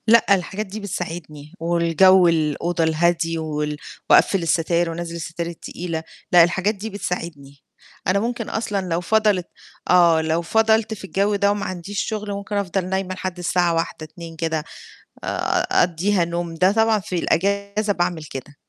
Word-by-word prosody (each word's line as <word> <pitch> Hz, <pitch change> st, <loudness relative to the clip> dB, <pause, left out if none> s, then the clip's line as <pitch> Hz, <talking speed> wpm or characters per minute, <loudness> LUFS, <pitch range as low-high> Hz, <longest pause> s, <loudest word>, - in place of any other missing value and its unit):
لأ، 220 Hz, -3 st, +6 dB
الحاجات 190 Hz, +3 st, -4 dB
دي 205 Hz, +2 st, -7 dB
بتساعدني 165 Hz, -6 st, -6 dB
والجَوّ 175 Hz, +2 st, +4 dB
الأوضة 165 Hz, +1 st, 0 dB
الهادي 165 Hz, +1 st, +1 dB
وال 150 Hz, -2 st, -3 dB, 0.3 s
وأقفِّل 195 Hz, -4 st, +5 dB
الستاير 170 Hz, +1 st, +1 dB
وانزِّل 170 Hz, 0 st, -5 dB
الستاير 170 Hz, 0 st, -4 dB
التقيلة، 170 Hz, -1 st, -5 dB, 0.3 s
لأ 175 Hz, -1 st, +8 dB
الحاجات 190 Hz, +5 st, +1 dB
دي 210 Hz, +3 st, -6 dB
بتساعدني. 165 Hz, -8 st, -6 dB, 0.5 s
أنا 190 Hz, +2 st, +3 dB
ممكن 235 Hz, +1 st, -3 dB
أصلًا 205 Hz, -4 st, -2 dB
لو 165 Hz, +1 st, 0 dB
فَضَلِت 210 Hz, -2 st, +2 dB, 0.4 s
آه 170 Hz, -3 st, +5 dB
لو 160 Hz, +1 st, 0 dB
فَضَلت 220 Hz, +4 st, +2 dB
في 210 Hz, -, -9 dB
الجَوّ 200 Hz, +2 st, 0 dB
ده 200 Hz, 0 st, +2 dB
وما 205 Hz, 0 st, -2 dB
عنديش 185 Hz, +2 st, -5 dB
شغل 210 Hz, -2 st, -3 dB
ممكن 200 Hz, +1 st, -5 dB
أفضل 190 Hz, -2 st, -1 dB
نايمة 190 Hz, 0 st, -2 dB
لحد 185 Hz, -1 st, -5 dB
الساعة 175 Hz, -1 st, +1 dB
13:00 165 Hz, -1 st, -2 dB
14:00 165 Hz, +1 st, -10 dB
كده، 160 Hz, -1 st, -2 dB, 0.6 s
أ -, -, -6 dB, 0.5 s
أقضِّيها 175 Hz, +2 st, +1 dB
نوم، 170 Hz, 0 st, -3 dB
ده 185 Hz, +3 st, +4 dB
طبعًا 220 Hz, 0 st, +3 dB
في 185 Hz, -1 st, -5 dB
الإجازة 200 Hz, +4 st, 0 dB
باعمل 175 Hz, -3 st, -1 dB
كده. 145 Hz, -1 st, -8 dB
175 Hz, 155 wpm, -22 LUFS, 165-200 Hz, 0.6 s, لأ